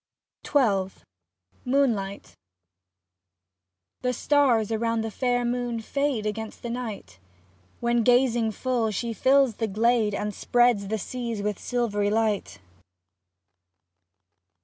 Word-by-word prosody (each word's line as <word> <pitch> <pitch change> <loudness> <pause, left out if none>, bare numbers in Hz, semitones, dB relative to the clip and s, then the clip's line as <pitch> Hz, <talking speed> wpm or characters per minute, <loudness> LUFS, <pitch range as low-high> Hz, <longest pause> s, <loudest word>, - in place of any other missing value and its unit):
XII 200 -9 +2 0.7
MOONLIGHT 235 -7 0 1.7
The 250 0 0
stars 245 -5 +2
around 230 0 0
the 225 0 -4
fair 245 +1 0
moon 240 -1 -2
fade 275 -1 -1
Against 215 +1 -5
the 235 - -4
night. 210 - -6 0.6
When 235 0 +2
gazing 240 -2 +3
full 245 -1 -1
she 230 +2 -3
fills 265 -1 +3
the 225 - -1
glade 220 0 +2
And 210 +1 -3
spreads 240 -2 +2
the 220 +2 -1
seas 230 0 -4
with 210 -2 -2
silvery 210 -5 -1
light. 215 - 0
230 Hz, 105 wpm, -26 LUFS, 210-245 Hz, 1.7 s, gazing